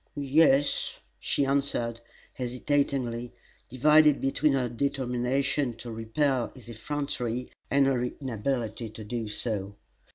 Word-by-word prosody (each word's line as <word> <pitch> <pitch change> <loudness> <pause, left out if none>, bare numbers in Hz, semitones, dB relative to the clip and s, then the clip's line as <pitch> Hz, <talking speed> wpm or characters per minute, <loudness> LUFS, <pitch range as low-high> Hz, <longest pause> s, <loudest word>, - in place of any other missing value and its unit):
"Ye 145 +2 +3
es," 140 -2 +3 0.2
she 140 - +1
answered, 135 -4 0 0.3
hesitatingly, 125 -2 -1 0.4
divided 150 +3 +5
between 135 +2 +2
her 130 -2 +1
determination 130 +1 0
to 120 0 -8
repel 120 +3 0
his 125 -3 -14
effrontery 125 0 -3 0.2
and 140 0 +4
her 130 -2 +1
inability 120 -3 -3
to 110 +1 -9
do 115 +1 -4
so. 105 -2 -2
125 Hz, 110 wpm, -28 LUFS, 115-140 Hz, 0.4 s, divided